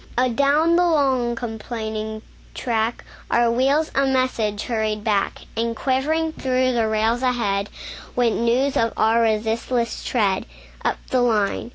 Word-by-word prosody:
Adown 280 +7 +3
the 355 - +4
long, 265 -7 +2
complaining 220 -2 -5 0.3
track, 230 -1 -1 0.2
Our 235 0 +3
wheels 275 +6 +2
a 275 - +2
message 245 -6 0
hurried 215 -2 -2
back; 205 -3 0
And 230 +1 -1
quivering 310 +6 0
through 255 -2 +1
the 230 -3 +1
rails 220 +2 +1
ahead, 210 -6 0 0.5
Went 235 -2 +1
news 250 +4 +1
of 230 0 +1
our 225 +1 +3
resistless 225 +2 0
tread, 205 -6 0 0.4
Up - - 0
the 255 - +3
line. 220 -2 +1
235 Hz, 135 wpm, -22 LUFS, 220-260 Hz, 0.5 s, the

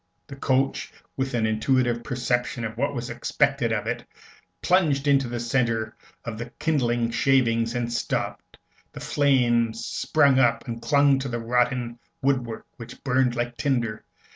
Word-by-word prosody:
The 140 - -10
coach, 135 0 0 0.2
with 130 -1 -2
an 115 -2 +1
intuitive 120 +2 +1
perception 125 -1 -1
of 110 0 -5
what 140 +4 -1
was 120 0 -4
expected 120 +1 0
of 110 -2 -1
it, - - -3 0.6
plunged 155 -6 +2
into 135 -2 +3
the 120 0 -4
centre 115 -2 0 0.3
of 115 -2 -5
the 120 +1 -5
kindling 120 -7 0
shavings, 115 -3 +2
and 120 -1 -2
stopped. - - -3 0.4
The - - -8
flames 120 -5 +1
sprung 140 -4 +2
up 120 -1 +2
and 115 -1 -5
clung 140 +2 +4
to 135 0 -4
the 120 - -2
rotten 120 0 0 0.2
woodwork, 125 -4 -1
which 115 0 -11
burned 130 -2 +2
like 120 0 -3
tinder. 120 -6 -1
120 Hz, 150 wpm, -25 LUFS, 115-135 Hz, 0.6 s, clung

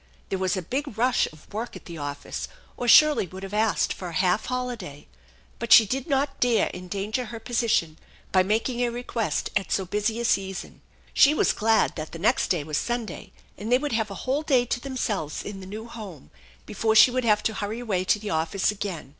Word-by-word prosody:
There 190 - -2
was 185 +1 0
a 185 - -3
big 265 - -4
rush 245 +2 +2
of 155 +5 -18
work 225 +3 -4
at - - -11
the 170 -2 -8
office, 145 0 -5 0.3
or 245 - -4
Shirley 300 -5 +6
would 185 +3 -10
have 195 +1 -7
asked 215 0 +1
for 185 - -7
a 170 - -7
half 185 +4 +1
holiday; 250 - -5 0.5
but 235 0 -5
she 225 - +10
did 260 - -3
not 275 -1 0
dare 240 -2 +2
endanger 200 +7 -3
her 230 0 -7
position 225 -10 0 0.3
by 185 - +5
making 225 +6 0
a 245 -1 +2
request 235 -1 -2
at 195 -4 -1
so 190 - +1
busy 210 +4 -1
a 235 - -2
season. 195 -4 -2 0.3
She 290 +2 +6
was - - +3
glad 225 +1 +2
that 155 0 -6
the - - -5
next 215 +9 +2
day 170 -5 0
was 150 0 -2
Sunday 240 -6 -4 0.3
and 215 +4 -4
they 250 - +6
would 290 +2 -3
have 220 -2 0
a 195 - -8
whole 270 +3 +1
day 260 -6 +2
to 245 - -2
themselves 230 - -3
in 200 -1 -7
the 185 - -9
new 215 +3 -7
home 205 - -10 0.3
before 220 +1 0
she 235 +4 +8
would 255 0 -1
have 210 -2 +3
to 220 - 0
hurry 210 +2 -4
away 200 -7 -1
to 210 - +3
the 210 0 -5
office 165 +6 +1
again. 195 -9 -5
215 Hz, 215 wpm, -25 LUFS, 185-245 Hz, 0.5 s, she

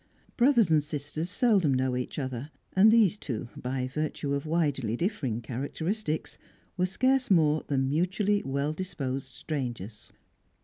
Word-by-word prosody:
Brothers 240 - +4
and 155 -2 +4
sisters 150 +2 -4
seldom 200 - +3
know 130 0 +1
each 125 0 -4
other; 130 -1 -4 0.2
and 195 +3 +7
these 215 -3 +4
two, 120 -3 -4
by 130 0 -3
virtue 145 0 -2
of 140 +2 -2
widely 145 -8 0
differing 135 - -1
characteristics, 155 - -3 0.4
were 180 -1 +1
scarce 260 +7 +2
more 155 -5 +4
than 135 -2 +1
mutually 190 +7 +1
well 140 +3 -1
disposed 135 -7 -4
strangers. 120 - -5
150 Hz, 135 wpm, -28 LUFS, 130-185 Hz, 0.4 s, and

